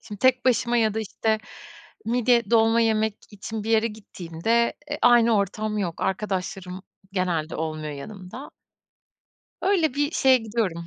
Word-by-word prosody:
Şimdi 205 -1 -10
tek 255 +1 +3
başıma 240 -1 +2
ya 220 -2 +2
da, 220 - -1
işte, 220 +1 -1 0.7
midye 235 -2 +2
dolma 225 0 +4
yemek 220 -1 +1
için 210 +1 -6
bir 225 - -3
yere 225 0 +3
gittiğimde, 210 +1 -1 0.2
e, - - -3
aynı 235 -2 +5
ortam 210 +2 -1
yok. 175 -4 -3
Arkadaşlarım 190 -1 -3 0.3
genelde 170 -4 -1
olmuyor 155 -1 -4
yanımda. 195 - -9 1.1
Öyle 355 -8 +2
bir 290 +1 0
şeye 265 -4 +4
gidiyorum. 210 -7 -2
220 Hz, 140 wpm, -24 LUFS, 190-235 Hz, 1.1 s, aynı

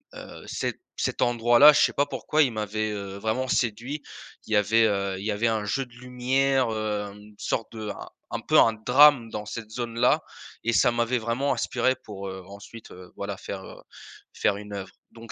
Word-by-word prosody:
heu, - - -10
cet - - -3 0.2
cet - - -2
endroit-là, 120 +4 +6
je - - +3
sais - - +4
pas 145 - +2
pourquoi, 150 +2 0
il 130 -6 +2
m'avait, 110 0 -2
heu, 100 -1 -6
vraiment 110 +5 -2
séduit. 120 +6 -1 0.5
Il 110 - -3
y - - +4
avait, 110 +3 +4
heu, 100 -2 -1
il 100 - -7
y 110 - 0
avait 110 +3 0
un 110 -2 -1
jeu 135 +6 -1
de 125 - -24
lumière, 125 +1 0
heu, 110 -1 -2
une 105 0 -16
sorte 115 - -2
de 110 -1 -6
un - - -7 0.2
un - - -2
peu - - +2
un 115 - +5
drame 125 +2 +5
dans 105 -1 -5
cette 110 +1 -7
zone-là 120 +1 +1 0.4
et 115 +1 0
ça 120 - +4
m'avait 120 +1 +1
vraiment 120 +5 -1
inspiré 130 +1 0
pour, 100 -2 -7
heu, 95 -1 -8
ensuite, 100 +3 -12
heu, 90 0 -13
voilà 100 0 -4
faire, 95 -1 -7
heu, - - -12 0.5
faire 100 - +1
une 105 0 -9
œuvre. 100 -1 -6 0.2
Donc 115 -1 -12
115 Hz, 205 wpm, -26 LUFS, 105-125 Hz, 0.5 s, endroit-là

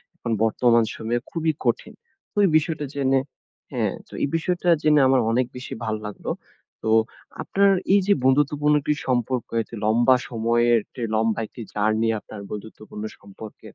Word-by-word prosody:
এখন 120 - -5
বর্তমান 115 +1 +3
সময়ে 115 +2 -2
খুবই 160 -1 0
কঠিন। - - 0 0.4
তো - - -22
এই - - +3
বিষয়টা 155 -1 -2
জেনে 135 -1 +2 0.5
হ্যাঁ, - - -1
তো - - -17
এই - - +2
বিষয়টা 175 +2 0
জেনে 150 -1 +4
আমার 130 -1 +4
অনেক 125 +2 +2
বেশি 125 - -7
ভালো 110 -1 -2
লাগলো। 105 - -7 0.5
তো - - -1 0.5
আপনার 200 0 +3 0.2
এই 200 - +6
যে 205 - +6
বন্ধুত্বপূর্ণ 145 +2 +3
একটি 150 - +1
সম্পর্ক, 125 -1 0
এতো 115 - -9
লম্বা 120 +4 +4
সময়ের 120 0 +2
টে 125 - -5
লম্বা 110 0 +1
একটি 120 - -11
জার্নি 110 +2 +1
আপনার 105 0 -10
বন্ধুত্বপূর্ণ 105 0 -8 0.2
সম্পর্কে, 100 +2 -12
120 Hz, 155 wpm, -23 LUFS, 110-145 Hz, 0.5 s, এই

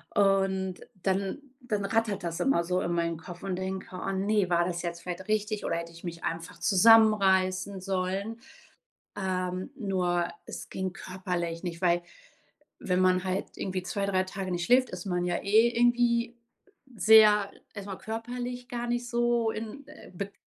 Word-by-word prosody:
Und 195 -2 +2 0.3
dann 195 +5 0 0.2
dann 215 -5 -2
rattert 205 -2 0
das 170 -1 -3
immer 270 -11 +2
so 180 +2 0
in 175 - -2
meinen 170 -1 0
Kopf 175 +2 -10
und 190 -2 -2
denke: 190 0 -4
„Oh 195 - -2
ne, 200 0 +1
war 175 -1 +3
das 170 -1 -3
jetzt 170 0 -4
vielleicht 180 +1 -6
richtig 215 0 0
oder - - 0
hätte 170 0 -6
ich 170 - -14
mich 170 -1 -6
einfach 165 +1 -4
zusammenreißen 195 -3 +4
sollen.” 195 +4 -2 0.8
Ähm, 185 -1 -2
nur 180 -7 0 0.2
es - - -8
ging 190 -1 -3
körperlich 180 -3 -4
nicht, 170 -1 -5
weil 175 -1 +3 0.8
wenn 180 0 0
man 185 0 +3
halt 185 +1 -3
irgendwie 185 -1 -3
2, 195 +2 -2
3 185 -1 +2
Tage 190 0 -5
nicht 175 -1 -1
schläft, 255 +4 +4
ist 180 +1 -6
man 180 -2 -1
ja 175 -1 0
eh 220 +4 +5
irgendwie 240 0 +2 0.6
sehr 215 -2 +6 0.2
erst 200 -2 -7
mal 195 -2 -5
körperlich 245 +2 -5
gar 240 -1 -3
nicht 240 0 -1
so 240 -1 +1
in 225 +6 -7
äh, 300 - -13
beg 200 +2 -5
190 Hz, 165 wpm, -28 LUFS, 180-220 Hz, 0.8 s, sehr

